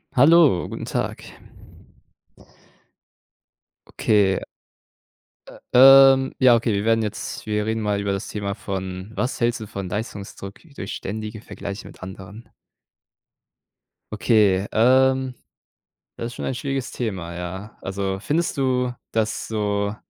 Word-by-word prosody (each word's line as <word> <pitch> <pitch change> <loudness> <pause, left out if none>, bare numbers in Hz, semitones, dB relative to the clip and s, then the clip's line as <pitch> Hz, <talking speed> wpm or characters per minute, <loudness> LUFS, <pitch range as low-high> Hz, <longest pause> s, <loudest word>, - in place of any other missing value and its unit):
Hallo, 145 - +5
guten - - -6
Tag. - - -3 2.6
Okay. 100 -3 +2 1.1
Ä - - -13 0.5
ähm, 130 0 -1
ja, 125 -3 +6
okay, 115 -1 0
wir 100 +1 -1
werden 115 0 +3
jetzt 110 0 -5
wir 105 -1 -1
reden 110 0 -1
mal 105 -1 0
über 100 -1 -1
das 100 - -5
Thema 100 -2 -4
von 95 -1 -6
was 125 +3 -3
hältst 120 +1 +1
du 110 - -7
von 100 -2 -6
Leistungsdruck 100 -1 -6 0.2
durch 95 - -6
ständige 110 +1 -6
Vergleiche 100 -1 -7
mit - - -14
anderen? 95 +4 -10 1.7
Okay, 105 -3 +3
ähm, 130 +2 +3 0.8
das 115 - -4
ist 120 - -9
schon - - -5
ein - - -1
schwieriges 135 0 -3
Thema, 95 -8 -4
ja. 95 +4 -7
Also, 95 0 -3
findest 165 +8 -1
du, 125 -2 0 0.2
dass 110 -1 -1
so 105 -1 -1
105 Hz, 125 wpm, -22 LUFS, 100-120 Hz, 2.6 s, ja